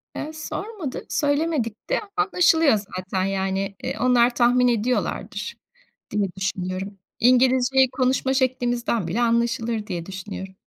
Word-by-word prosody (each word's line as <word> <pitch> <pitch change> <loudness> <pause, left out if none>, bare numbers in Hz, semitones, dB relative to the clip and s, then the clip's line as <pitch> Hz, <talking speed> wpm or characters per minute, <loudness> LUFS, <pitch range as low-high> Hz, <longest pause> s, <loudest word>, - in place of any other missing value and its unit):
Iıı, 310 - -5
sormadı, 320 - -5
söylemedik 285 -6 -1
de - - +2 0.2
anlaşılıyor 345 - +4 0.2
zaten. 185 0 -2
Yani, 195 0 -1
eee, - - -2
onlar 245 -1 +4
tahmin 250 +1 +4
ediyorlardır 240 +1 -1 0.6
diye 205 -1 +1
düşünüyorum. 190 +1 -3 0.2
İngilizceyi 255 +1 +4
konuşma 260 0 +1
şeklimizden 245 - 0
bile 210 +8 -1
anlaşılır 235 -2 0
diye 175 -4 -4
düşünüyorum. 190 0 -7
240 Hz, 110 wpm, -23 LUFS, 195-265 Hz, 0.6 s, anlaşılıyor